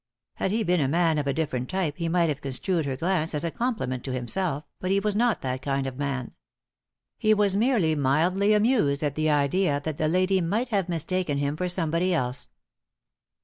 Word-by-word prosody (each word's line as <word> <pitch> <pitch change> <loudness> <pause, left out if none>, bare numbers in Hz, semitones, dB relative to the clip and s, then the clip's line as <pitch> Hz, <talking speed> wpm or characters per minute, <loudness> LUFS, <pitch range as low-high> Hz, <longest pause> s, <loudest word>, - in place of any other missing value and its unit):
Had - - 0
he 220 +3 0
been 180 -2 +2
a 135 - +2
man 165 +1 +2
of 145 - -2
a 140 - +1
different 130 -5 -2
type 180 -6 -1
he 170 -2 -2
might 170 0 +2
have 150 -1 -3
construed 145 +4 -1
her 130 -1 -2
glance 165 -1 0
as 150 - -1
a 170 - -1
compliment 220 - -2
to 135 - -3
himself, 145 +5 -2 0.2
but 185 - -3
he 195 +1 +3
was 210 +1 -1
□ot 230 +2 +1
that 130 0 -3
kind 135 0 -1
of 135 0 -6
man. 135 -3 -3 0.9
He 215 0 +4
was 205 -2 +2
merely 210 -7 +2
mildly 170 +9 +2
amused 210 - +2
at 145 -2 0
the 155 +1 0
idea 145 +2 +2
that 155 -1 -4
the 155 - +2
lady 185 +3 +2
might 215 +9 -1
have 195 -5 0
mistaken 170 -2 -1
him 140 +1 -1
for 180 +3 -2
somebody 175 +1 +1
else. 125 -4 -2
165 Hz, 205 wpm, -26 LUFS, 140-190 Hz, 0.9 s, He